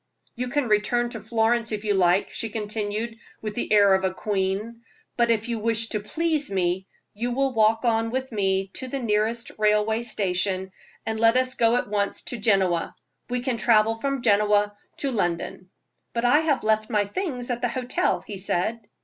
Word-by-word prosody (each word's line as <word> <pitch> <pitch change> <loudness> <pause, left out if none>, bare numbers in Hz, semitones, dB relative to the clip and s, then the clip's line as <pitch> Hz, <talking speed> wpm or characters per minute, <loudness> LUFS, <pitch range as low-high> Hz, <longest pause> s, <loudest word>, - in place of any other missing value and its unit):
"You 250 +1 -3
can 270 +1 0
return 235 +3 +1
to 225 - -5
Florence, 225 +2 +1
if 210 -1 -3
you 210 -1 +1
like," 185 0 +2
she 225 - -3
continued, 215 +1 -3 0.2
with 215 -1 -5
the 240 - -3
air 200 -2 +6
of 190 0 +2
a 190 - +1
queen; 205 +4 -2 0.3
"but 235 -1 +2
if 225 0 +1
you 235 -2 -2
wish 225 +1 +1
to 215 - -1
please 310 +7 -1
me, 190 0 -1 0.3
you 240 +4 -2
will 270 0 +1
walk 225 +1 +3
on 225 -1 +2
with 260 +2 -3
me 195 -2 0
to 260 - -5
the 275 - -3
nearest 230 0 0
railway 210 +1 +2
station, 190 -4 -1 0.3
and 220 0 -2
let 230 +2 +5
us 255 0 +1
go 230 -1 +3
at 245 - 0
once 200 -1 -1
to 240 - -5
Genoa. 190 -5 +1 0.3
We 250 0 -1
can 250 -2 -1
travel 225 -1 +4
from 270 +2 -3
Genoa 205 -1 +3 0.2
to 275 - -1
London." 180 -3 -2 0.4
"But 235 +1 -1
I 285 +5 +5
have 315 -4 +1
left 215 0 +1
my 210 -1 +2
things 250 - -3
at 240 0 -2
the 245 - +1
hotel," 250 +1 -1
he 200 -3 -6
said. 200 +4 -1
220 Hz, 190 wpm, -25 LUFS, 205-240 Hz, 0.4 s, air